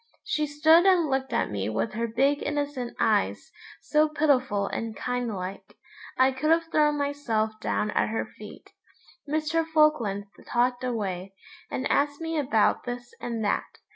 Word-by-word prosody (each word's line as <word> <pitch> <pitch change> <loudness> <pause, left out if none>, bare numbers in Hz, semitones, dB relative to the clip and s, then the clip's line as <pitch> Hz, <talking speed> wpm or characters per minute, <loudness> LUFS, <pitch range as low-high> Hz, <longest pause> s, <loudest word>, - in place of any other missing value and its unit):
She 305 -1 -1
stood 315 +5 +5
and 345 -6 +4
looked 265 -1 -1
at 235 - 0
me 100 0 -2
with 115 +1 -2
her 230 +2 -1
big 275 +6 +1
innocent 290 -4 -3
eyes, 215 -3 +1 0.3
so 305 0 +3
pitiful 260 -9 +1
and 225 +2 -4
kind 245 -2 -2
like. 190 0 -7 0.4
I 260 +1 +5
could 265 +4 -2
have 330 0 +2
thrown 300 -2 +3
myself 280 -7 -1
down 210 -1 -1
at - - +1
her 225 - -2
feet. - - -11 0.6
Mr. 310 +2 +1
Falkland 305 -11 +2 0.2
talked 245 +1 +1
away, 195 -6 -3 0.3
and 260 - -2
asked 285 0 +1
me 325 0 -3
about 230 -7 +2
this 245 0 -6
and 230 -2 -3
that. 205 - -1
255 Hz, 155 wpm, -26 LUFS, 220-300 Hz, 0.6 s, stood